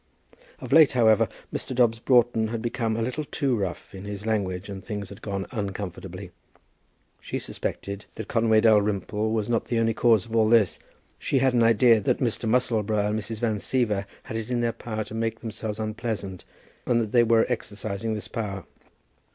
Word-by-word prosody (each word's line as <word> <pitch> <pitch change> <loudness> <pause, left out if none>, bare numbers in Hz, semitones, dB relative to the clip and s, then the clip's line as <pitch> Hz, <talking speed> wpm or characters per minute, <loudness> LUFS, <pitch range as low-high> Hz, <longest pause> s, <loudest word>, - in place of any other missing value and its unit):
Of - - -4
late, 155 -4 +7
however, 110 -4 +4 0.2
Mr. 130 - -3
Dobbs 120 -2 +3
Broughton 120 -2 +3
had 115 +1 -3
become 115 -1 -1
a 115 - 0
little 130 +6 -2
too 140 -3 0
rough 95 -4 -4
in 95 0 -8
his 105 0 -6
language, 100 -4 -1
and 100 -2 -7
things 105 -3 -5
had 100 - -11
gone 100 -2 -3
uncomfortably. 95 -4 -5 0.9
She - - -4
suspected 100 0 -5
that 110 - -6
Conway 110 -1 +3
Dalrymple 105 0 +2
was 110 -2 0
not 115 -1 0
the 120 - -1
only 115 0 +2
cause 110 -4 +3
of 115 - -6
all 110 -1 +4
this. 110 -5 +4 0.4
She 140 - 0
had 130 -1 +3
an 120 - +3
idea 115 0 +5
that - - +1
Mr. 115 -3 -1
Musselboro 110 -4 +1
and 110 - 0
Mrs. 110 +1 -5
Van 110 -3 +1
Siever 105 -3 0 0.2
had 110 - -5
it 115 0 -5
in 120 -1 0
their 115 -1 0
power 110 -2 -4
to 105 - -11
make 115 0 -2
themselves 110 -2 -5
unpleasant, 110 -4 -4 0.4
and 120 -1 +3
that 110 -3 -2
they 120 - +5
were 115 -1 +4
exercising 110 -2 -3
this 105 - -5
power. 100 -4 -4
110 Hz, 185 wpm, -26 LUFS, 105-115 Hz, 0.9 s, late